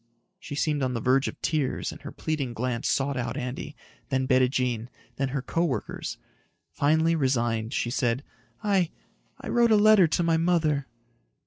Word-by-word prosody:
She 145 - -7
seemed 150 0 0
on 130 -1 0
the - - -1
verge 130 +4 +2
of - - -6
tears 150 -5 -1
and - - -11
her - - -7
pleading 140 -6 -3
glance 120 0 -2
sought 140 0 0
out 120 -2 -3
Andy, 125 +1 -5 0.3
then 130 0 +1
Bettijean, 125 -3 +2 0.3
then 135 - 0
her 135 -1 -3
co 170 - 0
workers. 130 -11 -3 0.5
Finally, 160 +3 +2
resigned, 120 -6 0
she 120 -3 -1
said, 125 0 0 0.4
"I... 195 -5 +2 0.5
I - - -8
wrote 235 -1 +4
a 220 - +6
letter 210 -3 +6
to 165 +2 0
my 165 -1 +3
mother." 160 -5 +1
135 Hz, 165 wpm, -27 LUFS, 125-160 Hz, 0.5 s, a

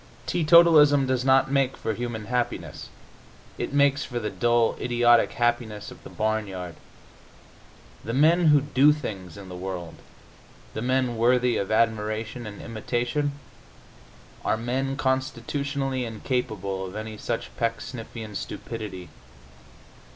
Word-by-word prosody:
Teetotalism 155 -4 +6
does 130 -1 0
not 135 0 +4
make 135 -2 +1
for 110 - -2
human 120 -1 -4
happiness; 125 +1 -3 0.7
it - - -3
makes 140 0 +3
for 120 -2 -4
the 105 -2 -3
dull, 120 -1 +2
idiotic 120 -1 +3
happiness 120 -3 -1
of - - -14
the - - -10
barnyard. 100 -5 -2 1.3
The 115 - -3
men 165 +4 +4
who 150 -2 +6
do 145 +1 +4
things 100 - -7
in 100 -1 -10
the 90 - -8
world, 90 -2 -5 0.8
the 110 - -4
men 130 -1 0
worthy 125 +1 +3
of 100 - -2
admiration 110 +1 0
and 105 -1 -9
imitation, 120 +6 -2 1.1
are - - +1
men 130 +4 -2
constitutionally 135 0 -1
incapable 110 -4 -3
of 90 - -10
any 110 0 -5
such 115 +2 -4
pecksniffian 115 -1 -4
stupidity. 100 -4 -6
120 Hz, 120 wpm, -25 LUFS, 110-135 Hz, 1.3 s, Teetotalism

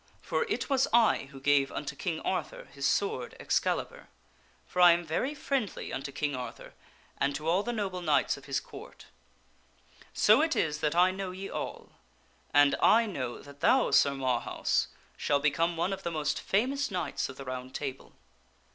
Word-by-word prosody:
For - - -1
it - - -2
was 270 -2 +2
I 230 -9 +4
who 140 -2 -11
gave 140 0 +3
unto 145 -1 -5
King 165 +1 -3
Arthur 180 -4 -3
his 140 0 -3
sword 140 -7 -1
Excalibur; - - -1 0.6
for 180 - -2
I 175 -1 +9
am 170 0 -2
very 255 - -1
friendly 270 -7 -3
unto 140 +1 -4
King 145 0 -2
Arthur 125 -1 -8 0.5
and 140 0 +1
to 150 +3 -5
all 175 +4 +3
the 240 - -3
noble 195 -5 -3
Knights 150 -5 +2
of 140 - -13
his 140 -1 -1
Court. 435 - -12 1.1
So - - +5
it 320 0 +1
is 150 -1 0
that 150 +1 0
I 180 +1 +5
know 190 0 -4
ye 190 +2 -7
all. - - -6 0.6
And 145 -1 +5
I 230 +1 +5
know 130 - -5
that 140 0 -14
thou, 255 - +3
Sir 140 -1 +4
Marhaus, 130 -3 0 0.3
shall 145 -1 +1
become 165 +4 +1
one 180 +4 0
of 195 - -6
the - - -3
most 155 -2 -2
famous 270 +8 0
Knights 180 -7 -2
of 135 - -10
the 135 - -8
Round 130 0 -6
Table." 135 -2 -6
160 Hz, 180 wpm, -29 LUFS, 140-195 Hz, 1.1 s, I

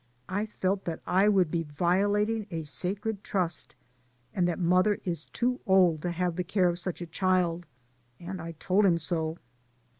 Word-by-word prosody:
I 205 +4 -2
felt 195 -1 -1
that 165 -2 -3
I 190 +3 +4
would 185 -6 +3
be 170 - 0
violating 200 +8 +1
a 165 -2 -4
sacred 195 - -3
trust, 180 -8 -2 0.6
and 175 -1 +1
that 175 - -1
mother 185 +4 +3
is 170 -4 -2
too 250 +1 -1
old 180 -5 +4
to 175 - -2
have 175 0 -1
the 180 - 0
care 180 0 +2
of 175 0 -3
such 180 0 -5
a - - -5
child, 175 -1 0 0.5
and 180 +1 -6
I 165 +1 -6
told 185 +6 +1
him 180 -4 +4
so. 160 -1 -1
180 Hz, 175 wpm, -28 LUFS, 170-195 Hz, 0.6 s, I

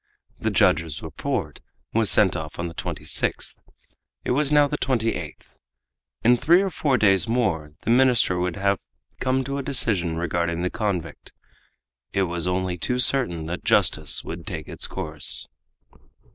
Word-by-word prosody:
The - - -1
judge's 80 -2 +1
report 80 -3 -4 0.3
was 110 -2 +4
sent 95 -4 +5
off 80 -3 -6
on 85 - -3
the 85 - -8
26th. - - -2 0.7
It - - -1
was 145 +3 +2
now 145 -1 +5
the 145 +1 -4
28th. 115 -4 -2 0.7
In 120 +2 +5
three 170 +9 +4
or 195 - -2
four 145 -5 +1
days 95 -2 +3
more 95 -11 -1
the 115 - 0
minister 120 -7 +3
would 90 -1 -1
have 100 0 0 0.4
come 130 +1 0
to 140 +2 -4
a - - -2
decision 105 - 0
regarding 85 0 -1
the 90 - -1
convict, 90 -8 -4 0.8
and 100 - +2
it - - +3
was 85 -1 -2
only 90 -1 -2
too 125 +9 -1
certain 125 -11 +1
that 85 +3 -5
justice - - +1
would - - -8
take - - -6
its - - +1
course. 70 -5 +2
95 Hz, 160 wpm, -23 LUFS, 85-125 Hz, 0.8 s, sent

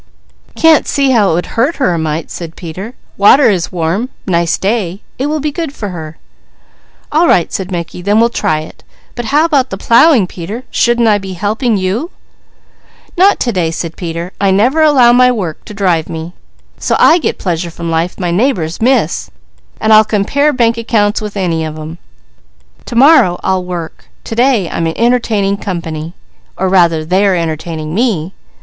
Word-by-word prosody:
"Can't 325 -2 +4
see 275 -2 +1
how 215 -6 +3
it - - +1
would 175 - -1
hurt 265 +8 -1
her 220 -11 0
a 170 - -2
mite," 160 0 -3
said 165 -2 -7
Peter. 185 +8 -8 0.2
"Water 220 +5 +5
is 180 -4 -2
warm, 180 +8 -2 0.2
nice 170 -3 0
day. 200 -2 -2 0.2
It 270 - 0
will 305 +1 -1
be 300 +1 -2
good 325 -1 -4
for 205 - -5
her." 160 -3 -8 0.9
"All 325 +3 +3
right," 170 - +2
said 190 -1 -3
Mickey, 175 -1 -5
"then 205 +4 +2
we'll 235 +1 +3
try 155 -8 -1
it. 155 - -13 0.3
But 240 - -5
how 295 +7 +2
about 280 -6 +1
the 195 - -5
plowing 235 - +4
Peter, 190 +7 -7
shouldn't 240 -1 +2
I 210 -1 +3
be 190 -1 -7
helping 210 +5 -1
you?" 195 - -2 1.1
"Not 390 +3 +4
to 240 - 0
day," 180 -6 0
said 165 0 -5
Peter. 170 0 -5
"I 200 - +3
never 240 +11 +2
allow 265 -6 +5
my 250 +1 +5
work 185 -10 -4
to - - -9
drive 180 -6 0
me, 160 +2 -6 0.5
so - - 0
I 345 - +5
get 275 - -2
pleasure 175 -2 -3
from 170 0 -6
life 165 +2 -2
my 175 -2 -1
neighbours 180 - -1
miss, 260 +3 +1 0.5
and 220 0 +3
I'll 215 0 +7
compare 220 +8 +1
bank 235 -3 +1
accounts 210 -3 0
with 210 -1 -6
any 170 -4 -1
of 155 -1 -5
them. 155 +2 -8 0.9
To - - -7
morrow 245 - +5
I'll 190 -1 0
work. 175 -3 -7
To - - -7
day 235 -5 +2
I'm 165 - -2
entertaining 215 0 0
company, 165 -4 -5 0.4
or 190 0 0
rather 170 -4 +2
they 185 +4 +1
are 190 - +2
entertaining 160 -1 -4
me. 195 -6 -1
195 Hz, 180 wpm, -13 LUFS, 170-240 Hz, 1.1 s, I'll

